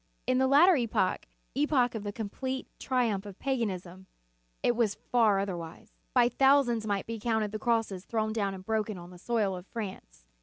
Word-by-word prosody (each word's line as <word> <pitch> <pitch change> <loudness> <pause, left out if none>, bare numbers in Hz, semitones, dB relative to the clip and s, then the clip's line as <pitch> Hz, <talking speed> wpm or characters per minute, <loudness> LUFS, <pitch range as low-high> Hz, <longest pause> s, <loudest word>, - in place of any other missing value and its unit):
In 255 0 +2
the 265 - +3
latter 325 +7 +6
epoch, 225 -6 0 0.3
epoch 270 -4 +2
of 220 - -4
the 205 0 -4
complete 260 +5 -4
triumph 235 -7 0
of 195 - -10
paganism, 190 -8 -3 0.6
it 240 - +3
was 225 -4 +1
far 225 -5 +2
otherwise. 175 -4 -5 0.2
By 245 -1 +6
thousands 245 -3 +3
might 200 -2 -1
be 230 0 -5
counted 220 -2 0
the 215 - -4
crosses 225 -5 0
thrown 220 -1 -1
down 200 -3 -1
and 185 0 -11
broken 215 -2 -1
on 175 0 -10
the 180 - -13
soil 210 -2 0
of 180 +1 -9
France. 190 - -7
220 Hz, 180 wpm, -29 LUFS, 195-245 Hz, 0.6 s, latter